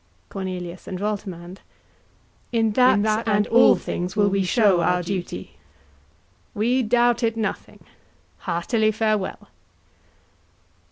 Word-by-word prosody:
CORNELIUS 185 Hz, -2 st, -6 dB
and 185 Hz, -, -5 dB
VOLTEMAND. 190 Hz, -3 st, -5 dB, 0.9 s
In 225 Hz, -2 st, +1 dB
that, 220 Hz, -1 st, +2 dB
and 210 Hz, -1 st, +2 dB
all 240 Hz, +3 st, +5 dB
things, 180 Hz, +3 st, -4 dB
will 205 Hz, -1 st, +3 dB
we 195 Hz, 0 st, 0 dB
show 195 Hz, -2 st, +3 dB
our 180 Hz, +2 st, +1 dB
duty. 180 Hz, 0 st, -4 dB
KING. -, -, -26 dB, 1.0 s
We 240 Hz, +5 st, +1 dB
doubt 240 Hz, +1 st, +2 dB
it 230 Hz, -1 st, 0 dB
nothing: 220 Hz, -1 st, -5 dB, 0.6 s
heartily 215 Hz, +5 st, 0 dB
farewell. 215 Hz, -2 st, -2 dB
210 Hz, 110 wpm, -23 LUFS, 185-225 Hz, 1.0 s, all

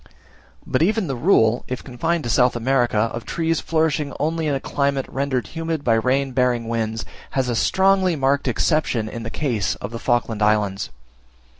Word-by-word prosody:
But -, -, 0 dB
even 210 Hz, +4 st, +2 dB
the 135 Hz, -4 st, -3 dB
rule, 120 Hz, -, +3 dB
if 125 Hz, 0 st, -5 dB
confined 165 Hz, +6 st, -2 dB
to 120 Hz, -, -3 dB
South 125 Hz, +4 st, +3 dB
America, 120 Hz, -1 st, +1 dB, 0.2 s
of 115 Hz, -, -5 dB
trees 165 Hz, +3 st, -1 dB
flourishing 155 Hz, -3 st, 0 dB
only 160 Hz, +1 st, 0 dB
in 145 Hz, -, +1 dB
a -, -, -1 dB
climate 140 Hz, -1 st, -1 dB
rendered 135 Hz, -4 st, -1 dB
humid 165 Hz, -2 st, -3 dB
by 115 Hz, -, +3 dB
rain 130 Hz, +4 st, +1 dB
bearing 125 Hz, -2 st, +1 dB
winds, 110 Hz, -1 st, -2 dB, 0.3 s
has 130 Hz, -2 st, +1 dB
a 120 Hz, -, 0 dB
strongly 190 Hz, +5 st, +3 dB
marked 140 Hz, 0 st, +1 dB
exception 125 Hz, -3 st, +1 dB
in 115 Hz, +2 st, -6 dB
the 115 Hz, -, -5 dB
case 115 Hz, -8 st, -1 dB
of -, -, -7 dB
the 115 Hz, -, -5 dB
Falkland 120 Hz, -3 st, 0 dB
Islands. 105 Hz, -2 st, +1 dB
130 Hz, 175 wpm, -22 LUFS, 115-155 Hz, 0.3 s, rule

